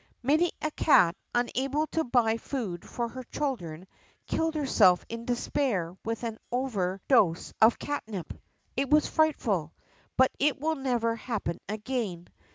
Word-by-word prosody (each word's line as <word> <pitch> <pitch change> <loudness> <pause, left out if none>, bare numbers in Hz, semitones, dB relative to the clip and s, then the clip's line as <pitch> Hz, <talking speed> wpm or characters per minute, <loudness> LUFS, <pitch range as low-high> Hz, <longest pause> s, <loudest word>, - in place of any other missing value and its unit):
Many 310 +7 +3
a 310 - 0
cat, 185 - +4 0.2
unable 270 +5 0
to 325 - +1
buy 235 -3 +2
food 220 -9 -5
for 240 -1 -2
her 255 +2 -7
children, 185 - -4 0.4
killed 325 0 -1
herself 210 -11 +4
in 230 0 -6
despair 235 - -1
with 230 +1 -3
an 225 -2 -4
over 205 -8 -1
dose 190 -11 +3
of 220 +1 +6
catnip. 220 - -4 0.4
It 275 -1 0
was 300 0 +5
frightful. 210 - +1 0.4
But 260 0 +5
it 290 0 +2
will 320 +3 +1
never 245 -5 0
happen 225 -7 -3
again. 215 -5 -3
240 Hz, 140 wpm, -28 LUFS, 200-275 Hz, 0.4 s, of